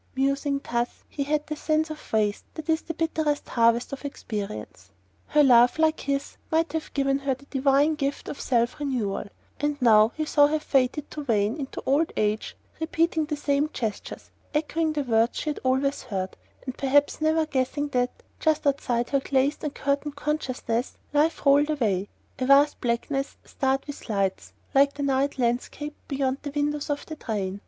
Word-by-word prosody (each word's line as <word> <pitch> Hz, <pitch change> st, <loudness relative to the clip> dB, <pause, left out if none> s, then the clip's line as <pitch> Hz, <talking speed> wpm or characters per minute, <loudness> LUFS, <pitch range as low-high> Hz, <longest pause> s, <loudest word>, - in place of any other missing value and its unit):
Musing 275 Hz, +1 st, +1 dB
thus, 240 Hz, +1 st, -2 dB
he 285 Hz, -, -6 dB
had 300 Hz, +1 st, 0 dB
the 305 Hz, -, -4 dB
sense 310 Hz, +1 st, 0 dB
of 310 Hz, -, -10 dB
waste 210 Hz, -2 st, +1 dB
that 315 Hz, -, -7 dB
is 320 Hz, 0 st, +2 dB
the 330 Hz, -, -6 dB
bitterest 315 Hz, -3 st, -1 dB
harvest 235 Hz, +2 st, +2 dB
of 275 Hz, -, -6 dB
experience. 200 Hz, -, -6 dB, 0.5 s
A 300 Hz, -, +7 dB
love 245 Hz, -1 st, +6 dB
like 315 Hz, 0 st, +2 dB
his 280 Hz, 0 st, -3 dB
might 325 Hz, +1 st, +1 dB
have 320 Hz, -1 st, -3 dB
given 275 Hz, -1 st, +2 dB
her 275 Hz, -1 st, 0 dB
the 275 Hz, +2 st, -18 dB
divine 280 Hz, +2 st, +3 dB
gift 285 Hz, -2 st, -3 dB
of -, -, -6 dB
self 240 Hz, 0 st, +1 dB
renewal; 245 Hz, -10 st, -2 dB, 0.3 s
and 295 Hz, 0 st, -1 dB
now 220 Hz, -2 st, +6 dB
he 310 Hz, -, 0 dB
saw 290 Hz, -1 st, +5 dB
her 310 Hz, +1 st, +1 dB
fated 275 Hz, -1 st, 0 dB
to 300 Hz, -, -5 dB
wane 215 Hz, -3 st, +1 dB
into 275 Hz, -3 st, -6 dB
old 290 Hz, +5 st, +2 dB
age 215 Hz, 0 st, -1 dB, 0.2 s
repeating 320 Hz, 0 st, +1 dB
the 300 Hz, 0 st, -2 dB
same 290 Hz, +1 st, +1 dB
gestures, 220 Hz, -4 st, -5 dB, 0.2 s
echoing 315 Hz, +1 st, 0 dB
the 295 Hz, -2 st, -1 dB
words 230 Hz, -2 st, +2 dB
she 305 Hz, -, -1 dB
had -, -, -6 dB
always 265 Hz, +2 st, +1 dB
heard, 190 Hz, -6 st, -4 dB, 0.3 s
and 260 Hz, -1 st, -4 dB
perhaps 285 Hz, +2 st, +2 dB
never 315 Hz, 0 st, +3 dB
guessing 285 Hz, 0 st, -1 dB
that, 250 Hz, -2 st, +1 dB, 0.3 s
just 315 Hz, -2 st, +1 dB
outside 250 Hz, -4 st, 0 dB
her 275 Hz, -, +3 dB
glazed 270 Hz, +3 st, 0 dB
and 295 Hz, -2 st, -3 dB
curtained 280 Hz, +1 st, -1 dB
consciousness, 265 Hz, -5 st, -2 dB, 0.2 s
life 305 Hz, +2 st, +2 dB
rolled 285 Hz, +2 st, +5 dB
away, 205 Hz, -10 st, 0 dB, 0.3 s
a 255 Hz, -, 0 dB
vast 280 Hz, +2 st, +5 dB
blackness 270 Hz, +4 st, -1 dB
starred 270 Hz, 0 st, -1 dB
with 290 Hz, -4 st, -9 dB
lights, 190 Hz, -, -1 dB, 0.2 s
like 280 Hz, +1 st, +5 dB
the 285 Hz, -, -3 dB
night 275 Hz, +1 st, +1 dB
landscape 255 Hz, +4 st, -1 dB
beyond 270 Hz, -1 st, -1 dB
the 290 Hz, -, -5 dB
windows 295 Hz, 0 st, -1 dB
of 290 Hz, 0 st, -2 dB
the 315 Hz, -, -7 dB
train. 200 Hz, -7 st, -3 dB
275 Hz, 180 wpm, -26 LUFS, 245-300 Hz, 0.5 s, A